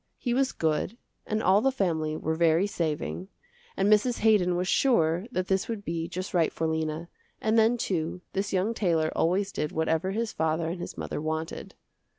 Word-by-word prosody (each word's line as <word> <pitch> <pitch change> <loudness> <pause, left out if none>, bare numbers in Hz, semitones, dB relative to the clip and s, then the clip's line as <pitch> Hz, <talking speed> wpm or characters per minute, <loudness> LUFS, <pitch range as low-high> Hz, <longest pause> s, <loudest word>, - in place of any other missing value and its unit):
He 245 - -1
was 265 +1 +2
good 160 +7 -1 0.3
and 215 0 -1
all 195 +3 +5
the 270 +3 +3
family 160 -10 -1
were 160 - -1
very 165 +2 +3
saving, 165 -1 -3 0.5
and 195 - +2
Mrs. 215 +4 +3
Haydon 205 -5 +4
was 180 +1 -1
sure 180 - +2
that 185 -5 -2
this 190 -1 +1
would 220 -3 -5
be 165 0 -2
just 185 +3 -5
right 170 -3 +3
for 165 - -2
Lena, 160 +1 -2 0.3
and 220 0 +1
then 225 +2 +4
too, 180 -5 -2
this 200 +1 -1
young 195 +4 +1
tailor 165 -7 +1
always 195 +4 +1
did 150 - -2
whatever 160 +3 0
his 220 +3 -2
father 160 +1 0
and 175 +1 -5
his - - -7
mother - - -4
wanted. 160 +1 -4
180 Hz, 185 wpm, -27 LUFS, 160-210 Hz, 0.5 s, all